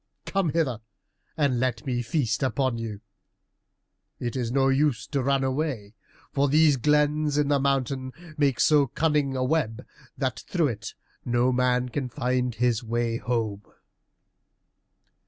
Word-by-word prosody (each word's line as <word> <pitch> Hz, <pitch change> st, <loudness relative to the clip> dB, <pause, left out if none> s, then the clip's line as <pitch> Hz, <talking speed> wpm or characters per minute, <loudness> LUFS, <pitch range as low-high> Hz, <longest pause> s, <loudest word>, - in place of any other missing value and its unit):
Come 195 Hz, -4 st, 0 dB
hither 145 Hz, -8 st, 0 dB, 0.6 s
and 140 Hz, -5 st, +2 dB
let 120 Hz, -3 st, -1 dB
me 125 Hz, -2 st, -1 dB
feast 120 Hz, -2 st, -1 dB
upon 130 Hz, -1 st, 0 dB
you. 110 Hz, -3 st, -5 dB, 1.2 s
It 120 Hz, -2 st, -3 dB
is 125 Hz, -3 st, -1 dB
of 125 Hz, -, -4 dB
no 135 Hz, 0 st, +4 dB
use 135 Hz, -3 st, +1 dB
to 140 Hz, -3 st, -2 dB
run 135 Hz, +1 st, +1 dB
away, 130 Hz, -6 st, -2 dB, 0.4 s
for 140 Hz, 0 st, +1 dB
these 150 Hz, 0 st, +5 dB
glens 150 Hz, +2 st, +2 dB
in 145 Hz, -1 st, +2 dB
the 145 Hz, -1 st, +3 dB
mountain 135 Hz, -1 st, -1 dB, 0.2 s
make 140 Hz, -5 st, +1 dB
so 145 Hz, -3 st, +4 dB
cunning 145 Hz, -1 st, 0 dB
a 130 Hz, -, 0 dB
web, 130 Hz, -5 st, -1 dB, 0.3 s
that 130 Hz, -3 st, -2 dB
through 165 Hz, -5 st, +1 dB
it 110 Hz, -2 st, -6 dB, 0.3 s
no 120 Hz, +1 st, +2 dB
man 125 Hz, 0 st, +1 dB
can 130 Hz, 0 st, -3 dB
find 125 Hz, -2 st, -1 dB
his 120 Hz, 0 st, +1 dB
way 115 Hz, 0 st, -1 dB
home." 115 Hz, -5 st, -2 dB
130 Hz, 145 wpm, -26 LUFS, 120-145 Hz, 1.2 s, these